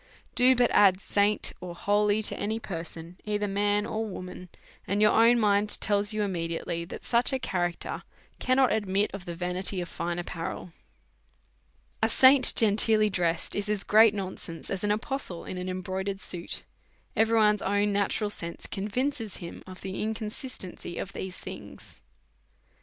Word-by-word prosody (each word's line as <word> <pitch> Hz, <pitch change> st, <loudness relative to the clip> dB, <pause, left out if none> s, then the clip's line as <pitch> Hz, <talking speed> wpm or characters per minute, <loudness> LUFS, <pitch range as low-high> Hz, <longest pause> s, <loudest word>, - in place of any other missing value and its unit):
Do 255 Hz, +1 st, +5 dB
but 245 Hz, -1 st, +2 dB
add 190 Hz, -2 st, +5 dB
saint 205 Hz, +1 st, +1 dB
or 175 Hz, -1 st, -7 dB
holy 205 Hz, +3 st, +1 dB
to -, -, +1 dB
any 220 Hz, +2 st, -2 dB
person, 170 Hz, -2 st, -8 dB
either 210 Hz, -1 st, -1 dB
man 205 Hz, +1 st, +1 dB
or 220 Hz, +1 st, -3 dB
wo 200 Hz, -4 st, -6 dB
man, 180 Hz, 0 st, -10 dB, 0.4 s
and 200 Hz, +2 st, 0 dB
your 210 Hz, 0 st, +5 dB
own 230 Hz, +2 st, +5 dB
mind 205 Hz, -1 st, +2 dB
tells 205 Hz, 0 st, 0 dB
you 215 Hz, -1 st, -1 dB
immediately 170 Hz, -2 st, -3 dB
that -, -, -9 dB
such 240 Hz, +2 st, +4 dB
a 265 Hz, -, +1 dB
character 175 Hz, -7 st, -3 dB, 0.4 s
cannot 255 Hz, -1 st, +3 dB
admit 205 Hz, -1 st, 0 dB
of 195 Hz, -2 st, -7 dB
the 170 Hz, -, -6 dB
vanity 180 Hz, +2 st, -2 dB
of 175 Hz, -, -4 dB
fine 170 Hz, +1 st, -4 dB
ap 175 Hz, -, -4 dB
parel. 175 Hz, +1 st, -6 dB, 1.3 s
A -, -, +3 dB
saint 260 Hz, 0 st, +7 dB
genteelly 215 Hz, 0 st, +5 dB
dressed 170 Hz, -2 st, -1 dB
is 205 Hz, +1 st, -3 dB
as 210 Hz, -2 st, -1 dB
great 215 Hz, 0 st, +5 dB
nonsense 185 Hz, -4 st, -6 dB
as 195 Hz, 0 st, -3 dB
an 205 Hz, -, 0 dB
apostle 210 Hz, -3 st, -3 dB
in 180 Hz, -, -6 dB
an 180 Hz, +1 st, -4 dB
embroidered 190 Hz, +1 st, -4 dB
suit; 175 Hz, -3 st, -5 dB, 0.5 s
every 225 Hz, +1 st, +3 dB
one's 210 Hz, -1 st, +4 dB
own 205 Hz, 0 st, +1 dB
natural 205 Hz, +1 st, 0 dB
sense 170 Hz, -4 st, -6 dB
convinces 225 Hz, +2 st, -3 dB
him 170 Hz, -2 st, -9 dB
of 185 Hz, 0 st, -10 dB
the 190 Hz, -1 st, -5 dB
inconsistency 215 Hz, -4 st, -4 dB
of 200 Hz, -, -5 dB
these 185 Hz, -1 st, -6 dB
things. -, -, -11 dB
205 Hz, 165 wpm, -27 LUFS, 180-215 Hz, 1.3 s, saint